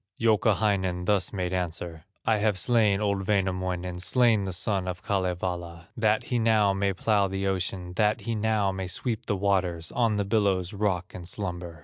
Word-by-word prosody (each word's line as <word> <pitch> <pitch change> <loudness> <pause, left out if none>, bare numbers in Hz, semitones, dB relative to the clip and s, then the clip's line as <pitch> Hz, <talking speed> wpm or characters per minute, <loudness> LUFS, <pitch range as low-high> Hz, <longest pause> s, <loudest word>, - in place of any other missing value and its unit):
Youkahainen 100 -5 +2
thus 100 -1 +1
made 90 -2 -2
answer: 85 -2 -4 0.2
"I 110 - +3
have 105 -2 +1
slain 105 -1 +3
old 100 -2 -1
Wainamoinen, 90 -3 -1
Slain 115 +1 +3
the 95 - -3
son 95 +1 0
of 90 0 -5
Kalevala, 90 -3 -3
That 110 -1 +2
he 125 - -1
now 110 -3 +3
may 100 0 +1
plow 100 +1 +1
the 95 +1 -3
ocean, 90 -1 -2
That 105 0 +2
he 115 - -3
now 105 -2 +1
may 95 -1 -4
sweep 110 +5 -3
the 100 - 0
waters, 90 -4 0
On 115 -3 +1
the 100 -1 0
billows 100 -4 +1
rock 95 -3 -1
and 85 -2 -7
slumber. 90 -3 -5
95 Hz, 170 wpm, -27 LUFS, 90-105 Hz, 0.2 s, I